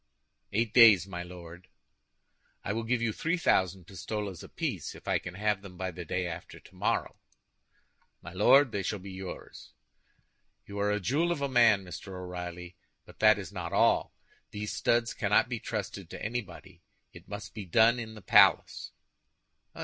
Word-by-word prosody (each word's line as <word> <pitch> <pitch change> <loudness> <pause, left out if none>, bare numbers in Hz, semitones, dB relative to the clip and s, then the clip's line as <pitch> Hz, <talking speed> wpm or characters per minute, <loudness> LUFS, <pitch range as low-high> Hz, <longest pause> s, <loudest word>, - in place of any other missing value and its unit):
"Eight 115 +2 0
days, 110 -7 +8
my 90 -3 -6
Lord." 90 0 -11 1.0
"I 100 - -2
will 115 - -2
give 120 0 0
you 110 -2 0
three 165 +9 -1
thousand 95 - +1
pistoles 100 0 -5
apiece - - -4
if - - -15
I - - +2
can 90 - -8
have 105 0 0
them 95 -3 -12
by 95 +1 -3
the 90 +1 -8
day 90 +3 -2
after 85 0 -7
tomorrow." - - -3 1.0
"My 85 - -11
Lord, 130 +7 +5
they 100 - -2
shall 105 +3 -2
be 100 0 -10
yours." 95 -8 -9 0.9
"You 100 0 -7
are 100 0 +1
a 105 - 0
jewel 150 - 0
of 170 - -1
a - - +1
man, 115 -7 +4
Mr. 90 +2 -9
O'Reilly; 90 -1 -7 0.3
but - - -17
that - - +6
is - - -7
not - - -6
all. - - +2 0.3
These 105 0 -5
studs 120 0 +1
cannot 105 0 +2
be 120 -2 -3
trusted 100 -5 -5
to - - -7
anybody; 95 -6 -6 0.3
it 85 +2 -14
must 105 0 -8
be 105 -3 -7
done 115 +7 +4
in 110 -1 -7
the 105 - -12
palace." - - +4
100 Hz, 170 wpm, -29 LUFS, 90-110 Hz, 1.0 s, days